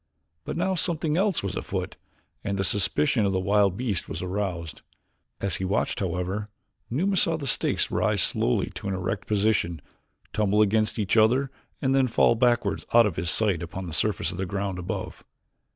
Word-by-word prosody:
But - - -4
now 190 +2 +1
something 165 -4 0
else 190 - +1
was 100 - -3
afoot - - -4 0.5
and 100 0 -2
the 95 - 0
suspicion 115 +4 +2
of 100 -1 +1
the 95 - +1
wild 100 0 +2
beast 115 -8 -2
was 80 - -4
aroused. 90 -4 -3 0.6
As 95 -3 -1
he 95 - -4
watched, 95 +3 0
however, 95 +3 -2 0.4
Numa 185 +11 0
saw 165 -3 +2
the 145 - -6
stakes 135 - +1
rise - - +1
slowly 60 - 0
to - - -6
an 95 - -1
erect 95 +2 -3
position, 100 -5 +1 0.5
tumble 105 0 +3
against 110 +2 +1
each 105 +1 0
other 125 +5 +4 0.3
and 135 0 +2
then 135 -1 +3
fall 115 - +4
backwards 120 0 +1
out 120 -1 +8
of 100 -6 -1
his 85 - -2
sight 100 -5 +1
upon 90 +2 -6
the 85 - -6
surface 100 +5 0
of - - -7
the 95 0 -2
ground 100 -1 -3
above. 90 +1 -5
105 Hz, 185 wpm, -26 LUFS, 95-120 Hz, 0.6 s, out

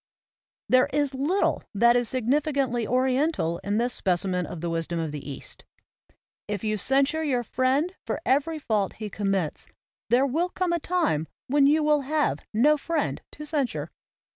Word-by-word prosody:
There 255 0 +4
is 290 -1 +1
little 295 +9 +1
that 235 +3 +5
is 245 -2 +1
significantly 260 -2 0
oriental 255 - +1
in 205 +1 -2
this 240 +2 +1
specimen 180 -1 0
of 175 - -7
the 170 +1 -3
wisdom 165 +1 -2
of 160 -2 -2
the 145 -1 -7
East: 140 - -8 0.8
"If 205 -1 -3
you 215 -1 0
censure 275 +8 +2
your 255 -5 0
friend 265 +9 +1
for - - -2
every 290 +5 +1
fault 215 -9 -1
he 210 -2 -7
com 200 -1 -2
mits, 185 -6 -1 0.4
there 250 +4 +4
will 325 +7 0
come 360 -1 -1
a 340 - +1
tune 310 - 0 0.2
when 280 +1 +4
you 305 +2 +3
will 300 -1 +3
have 295 +2 0
no 290 +8 +4
friend 320 +1 -2
to 300 - -8
censure." 285 -4 -2
255 Hz, 165 wpm, -26 LUFS, 210-300 Hz, 0.8 s, that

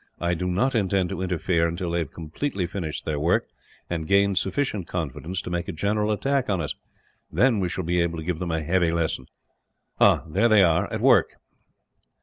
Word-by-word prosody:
I 85 0 0
do 90 +2 -2
not 100 +10 +1
intend 95 -5 +1
to 85 - -4
interfere 90 -2 +1
until 85 +1 -3
they 85 - 0
have 80 -5 -3
completely 90 - -3
finished 85 -3 -5
their 75 -2 -1
work, 85 +4 +2 0.4
and 80 -2 -3
gained 100 -1 +3
sufficient 100 -2 -2
confidence 85 +3 -4
to - - -6
make 85 0 -2
a - - -2
general 105 +5 0
attack 135 +5 0
on 95 -3 +1
us. 75 -5 -3 0.6
Then 125 -4 +3
we 90 -2 0
shall 90 +2 -3
be 85 +1 +1
able 85 -1 -1
to 80 - -5
give 90 -2 -2
them 90 -2 -3
a 80 -1 -1
heavy 85 +2 +2
lesson. 80 -6 -1 0.7
"Ah, - - +5
there 115 +9 +2
they 105 -3 +6
are, 85 -3 +2
at - - -3
work!" - - +4
90 Hz, 200 wpm, -25 LUFS, 85-100 Hz, 0.7 s, they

